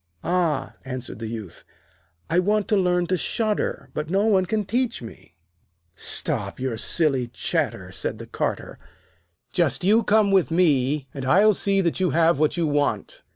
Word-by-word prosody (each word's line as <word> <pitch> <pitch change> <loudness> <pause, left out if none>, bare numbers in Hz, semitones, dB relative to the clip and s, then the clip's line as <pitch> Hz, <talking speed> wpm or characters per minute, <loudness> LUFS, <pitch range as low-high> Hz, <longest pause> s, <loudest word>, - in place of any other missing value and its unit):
'Ah,' 170 -4 0
answered 130 -4 -6
the 115 - -5
Youth, 110 -6 -8 0.6
'I 170 +2 +2
want 205 +2 +1
to 215 - +3
learn 180 -2 +2
to 185 - 0
shudder, 215 +5 -2
but 150 +1 -4
no 195 +4 +2
one 190 -4 +3
can 215 0 -1
teach 235 - -1
me.' 110 -6 -12 0.6
'Stop - - -3
your 130 -2 -2
silly 135 +1 +1
chatter,' - - -2
said - - -4
the - - -8
Carter. - - -4 0.7
'Just 170 +3 +1
you 215 +5 +4
come 210 -1 +3
with 190 -3 +3
me, 150 -5 +2
and 135 - -6
I'll 200 +11 +5
see 195 0 +1
that 170 -1 -1
you 185 -1 +2
have 165 +1 +3
what 155 +3 +1
you 170 - +1
want.' 145 -1 -1
170 Hz, 165 wpm, -24 LUFS, 140-195 Hz, 0.7 s, I'll